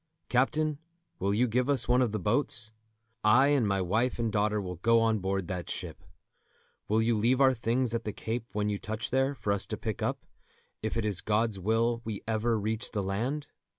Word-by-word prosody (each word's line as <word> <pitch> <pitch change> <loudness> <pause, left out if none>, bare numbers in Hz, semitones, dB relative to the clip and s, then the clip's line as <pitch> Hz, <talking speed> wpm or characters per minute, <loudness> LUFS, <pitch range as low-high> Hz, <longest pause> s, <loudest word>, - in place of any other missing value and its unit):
Captain, 150 +4 +1 0.4
will 100 +2 +1
you 115 +5 +2
give 125 +4 0
us 140 -2 +2
one 125 +1 +4
of 120 -4 +2
the 110 - -1
boats? 110 +2 -1 0.5
I 125 +6 +6
and 140 -7 +3
my 100 -1 +1
wife 110 +7 +1
and 115 -2 -1
daughter 105 +1 +1
will 90 -3 -5
go 115 +6 +4
on 110 -1 +2
board 95 -1 -2
that 90 -2 -4
ship. - - -6 0.8
Will 110 +2 +2
you 115 0 +2
leave 120 +5 +2
our 135 -1 +6
things 120 +1 0
at 115 0 -1
the 105 - -3
Cape 115 +3 -4
when 105 0 0
you 105 -1 -1
touch 110 +2 -4
there, 135 +2 +2
for 105 -4 -1
us 100 - -3
to - - -4
pick - - -4
up, - - -2 0.6
if 110 +1 -2
it 115 - 0
is 100 -4 0
God's 110 -1 0
will 115 +4 +1
we 110 -3 -5
ever 115 +1 +1
reach 110 +2 -2
the 105 -3 -2
land?" 120 +10 -2
110 Hz, 210 wpm, -29 LUFS, 105-125 Hz, 0.8 s, I